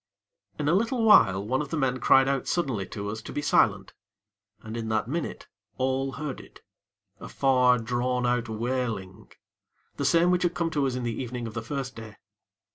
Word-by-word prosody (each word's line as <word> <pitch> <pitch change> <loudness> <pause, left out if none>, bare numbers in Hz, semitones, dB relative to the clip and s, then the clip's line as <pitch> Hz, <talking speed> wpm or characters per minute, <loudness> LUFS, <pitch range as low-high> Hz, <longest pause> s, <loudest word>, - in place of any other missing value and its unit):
In 150 - -2
a 155 - +3
little 230 +5 +1
while, 95 - +5
one 130 +5 0
of 145 - -5
the 160 - -2
men 130 -3 0
cried 135 +2 +5
out 135 -1 -1
suddenly 130 - -1
to 100 -1 -5
us 110 +1 -6
to - - -9
be 145 - -3
silent, - - +2 0.7
and, 110 0 -7
in 115 -1 -4
that 110 -1 0
minute, 160 +5 -4 0.3
all 135 +1 -1
heard 150 -3 -5
it - - -17 0.6
a - - -9
far, 125 -2 +3
drawn 125 +2 -1
out 120 -1 0
wailing; 110 -4 -4 0.7
the 140 - -2
same 170 +5 +4
which 180 0 +2
had 175 -1 0
come 165 -1 -1
to 145 -3 +1
us 130 - -2
in 125 - -3
the 115 0 -3
evening 125 -1 -5
of 115 - -6
the 115 - -4
first 135 +2 -5
day. 110 -2 -10
125 Hz, 200 wpm, -26 LUFS, 115-140 Hz, 0.7 s, while